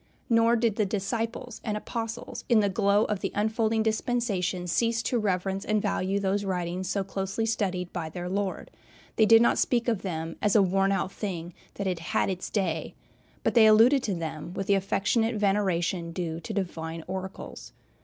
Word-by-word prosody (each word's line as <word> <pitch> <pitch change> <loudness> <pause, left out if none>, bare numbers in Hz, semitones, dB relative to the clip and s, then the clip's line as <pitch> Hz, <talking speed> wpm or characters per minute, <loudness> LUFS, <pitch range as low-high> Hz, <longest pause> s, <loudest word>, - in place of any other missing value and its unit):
Nor 230 +1 +5
did 225 -3 +1
the 215 - +3
disciples 225 +4 -3
and 210 -2 -2
Apostles 225 +1 -5
in 235 - +6
the 205 -1 +2
glow 200 +1 +3
of 210 -2 -2
the - - -3
unfolding 220 +1 +1
dispensation 215 -5 -1
cease 230 +6 +1
to 245 - 0
reverence 195 -1 -1
and 215 0 +1
value 195 0 0
those 200 +1 0
writings 180 -1 -2
so 200 -1 0
closely 195 +3 -2
studied 185 -5 -1
by 165 -3 -3
their 175 +2 -5
Lord. 195 +1 -3 0.5
They 220 - +5
did 225 +1 +7
not - - +3
speak 240 -1 +1
of 225 -5 +1
them 165 -3 -4
as 210 - +2
a 205 - +7
worn 195 +1 +2
out 195 -1 0
thing, 175 -5 -5 0.2
that 200 - -4
had 180 -3 -1
"had 165 - 0
its 185 0 -5
day," 170 -6 -2 0.5
but - - +1
they 225 -2 +7
alluded 230 +6 +6
to 205 -6 -2
them 160 0 -5
with 195 - -2
the 200 - +3
affectionate 215 +4 +1
veneration 190 -4 0
due 165 -2 -3
to 170 - -7
divine 165 -4 -4
oracles. 190 +1 -7
195 Hz, 185 wpm, -27 LUFS, 180-220 Hz, 0.5 s, did